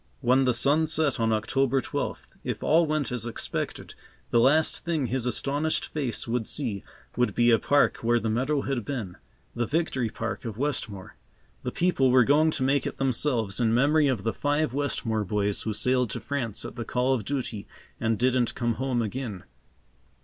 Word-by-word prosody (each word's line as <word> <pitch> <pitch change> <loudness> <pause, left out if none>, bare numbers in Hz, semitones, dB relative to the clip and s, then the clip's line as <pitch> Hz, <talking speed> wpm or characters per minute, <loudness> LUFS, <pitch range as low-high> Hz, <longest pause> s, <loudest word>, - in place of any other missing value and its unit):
When 130 +1 +3
the 125 - +3
sun 150 +6 +3
set 155 -4 0
on 115 -1 +2
October 135 +5 +1
twelfth, 125 - -4
if - - -4
all 165 +1 +4
went 150 -4 -1
as 120 -2 -2
expected, 115 - -4 0.4
the 120 - +4
last 150 +6 +3
thing 165 -5 0
his 125 0 -1
astonished 145 +6 0
face 135 -8 -2
would 115 -1 -1
see, 115 -9 -3 0.3
would 125 0 +1
be 120 0 +4
a 115 - +5
park 145 +6 +3
where 120 +1 +2
the 115 - -3
meadow 130 +6 0
had 135 -4 -2
been,—the 120 0 -6
Victory 140 -7 0
Park 115 +1 -4
of 110 -4 -6
Westmore. 120 -8 -3 0.4
The - - -3
people 170 -7 +2
were 125 0 +6
going 150 +5 +4
to 145 - -1
make 135 +1 +2
it - - -6
themselves 125 -5 0
in 115 -1 +2
memory 145 +4 +4
of 125 -8 0
the 115 - 0
five 145 -2 0
Westmore 120 -6 -1
boys 105 0 -1
who 110 - -2
sailed 125 +2 +1
to - - -3
France 125 -7 -3
at - - -8
the 120 - -3
call 125 +3 +1
of 120 -5 -1
duty 120 -4 -4 0.3
and 115 -1 0
didn't 125 0 +1
come 120 -2 0
home 130 -3 0
again. 110 -4 -5
125 Hz, 185 wpm, -27 LUFS, 115-140 Hz, 0.4 s, were